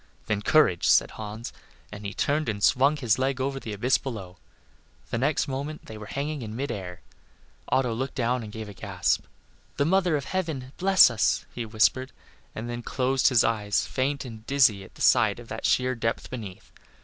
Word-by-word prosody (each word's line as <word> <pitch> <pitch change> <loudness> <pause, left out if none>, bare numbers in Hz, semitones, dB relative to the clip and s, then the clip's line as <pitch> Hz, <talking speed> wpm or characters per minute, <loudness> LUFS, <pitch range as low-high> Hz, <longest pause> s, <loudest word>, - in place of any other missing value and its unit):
"Then 105 -2 -1
courage," 105 - +3
said - - +4
Hans, 110 +2 -7 0.4
and 105 0 -8
he - - -4
turned 145 +4 0
and 105 -2 -3
swung 140 +4 +4
his 120 -4 +1
leg 135 0 0
over 135 +1 -1
the 110 - -7
abyss 120 +6 +1
below. 95 -8 -7 0.7
The 115 - -1
next 140 +4 +1
moment 140 +3 -5
they 110 - -9
were 105 -1 -9
hanging 145 +1 -3
in 110 -2 -6
mid 140 +4 -3
air. 90 -3 -6 0.7
Otto 125 -3 +2
looked 130 +4 -4
down 125 0 0
and 110 -2 -8
gave 110 0 -7
a 105 - -9
gasp. - - -1 0.5
"The 140 - +2
mother 180 -2 +2
of 140 - -5
heaven 160 -9 -3
bless 190 -7 +6
us," 110 -2 +1
he 120 -2 -5
whispered, 120 +4 +2 0.4
and 110 +2 -5
then 120 0 -4
closed 130 +1 +1
his 120 -3 +5
eyes, 105 -2 0
faint 140 +1 -2
and 110 -3 -9
dizzy 115 -8 +3
at - - -16
the - - -4
sight - - +4
of - - -12
that - - -2
sheer 130 0 +2
depth 115 -2 -3
beneath. 105 -7 -8
125 Hz, 195 wpm, -26 LUFS, 110-140 Hz, 0.7 s, bless